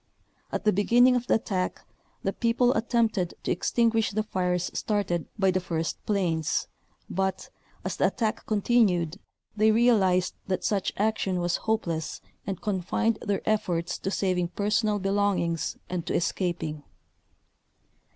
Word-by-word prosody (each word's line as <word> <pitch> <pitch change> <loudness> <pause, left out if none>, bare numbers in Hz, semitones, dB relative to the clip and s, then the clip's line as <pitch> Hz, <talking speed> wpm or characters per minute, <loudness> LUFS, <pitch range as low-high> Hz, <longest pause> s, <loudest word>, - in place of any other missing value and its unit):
At - - -3
the 210 - +4
beginning 245 +6 +5
of 245 0 -1
the - - +4
attack, 190 -5 -2 0.4
the 195 - 0
people 240 +1 +2
attempted 225 -7 +1
to - - -1
extinguish 225 +3 +2
the 215 +1 -1
fires 180 -3 -1
started 195 -6 -1
by 195 -2 +3
the 185 - +1
first 165 -2 -3
planes, 175 -7 0 0.4
but, 190 0 -2 0.3
as - - -3
the - - +4
attack 225 -2 -2
continued, 200 -6 +2 0.4
they 215 +1 +4
realized 210 -6 +3
that 185 -1 -1
such 200 -3 0
action 200 -3 0
was 175 0 0
hopeless 170 -8 -1 0.3
and 190 -2 -3
confined 210 +3 0
their 200 -1 -2
efforts 175 -5 0
to - - -2
saving 185 -3 0
personal 210 +3 +1
belong 200 0 +1
ings 170 -1 -2
and 180 -2 -3
to - - -1
escaping. 170 -4 -1
195 Hz, 140 wpm, -27 LUFS, 180-220 Hz, 0.4 s, beginning